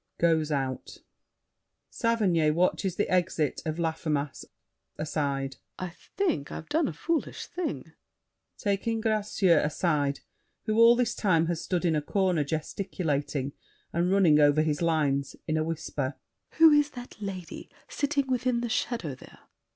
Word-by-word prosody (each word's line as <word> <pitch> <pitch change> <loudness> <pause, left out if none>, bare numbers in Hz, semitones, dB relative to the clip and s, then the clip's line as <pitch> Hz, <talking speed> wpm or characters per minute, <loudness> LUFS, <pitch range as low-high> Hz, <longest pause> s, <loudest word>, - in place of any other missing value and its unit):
[Goes 160 -2 +2
out. 135 -3 -3 0.9
SAVERNY 195 -9 +2
(watches 180 +3 +1
the - - 0
exit 175 -5 0
of 155 0 -2
Laffemas: 155 -4 -2 0.5
aside). 140 -3 -2 0.2
I 185 - -4
think 175 - -2
I've 155 - -7
done 315 -1 +2
a - - -2
foolish 330 -2 -2
thing. 165 - -4 0.7
[Taking 210 +3 -1
Gracieux 210 -5 +2
aside, 150 -2 0 0.4
who 215 0 +1
all 230 +1 +8
this 240 -1 +1
time 165 -6 +2
has 170 -1 -2
stood 180 -1 -1
in 165 -2 +2
a 150 - +1
corner 185 -1 +1
gesticulating 150 -3 -2 0.4
and 175 +2 +1
running 180 -6 +5
over 145 +1 +5
his 150 0 -1
lines: 145 -5 +1
in 155 - 0
a 155 - +1
whisper. 150 -4 -3 0.4
Who 320 0 +7
is 295 0 +4
that 245 -3 -10
lady 190 -4 -6 0.2
Sitting 285 -1 0
within 250 -2 0
the 240 - -2
shadow 225 - -1
there? - - -15
170 Hz, 140 wpm, -28 LUFS, 150-215 Hz, 0.9 s, all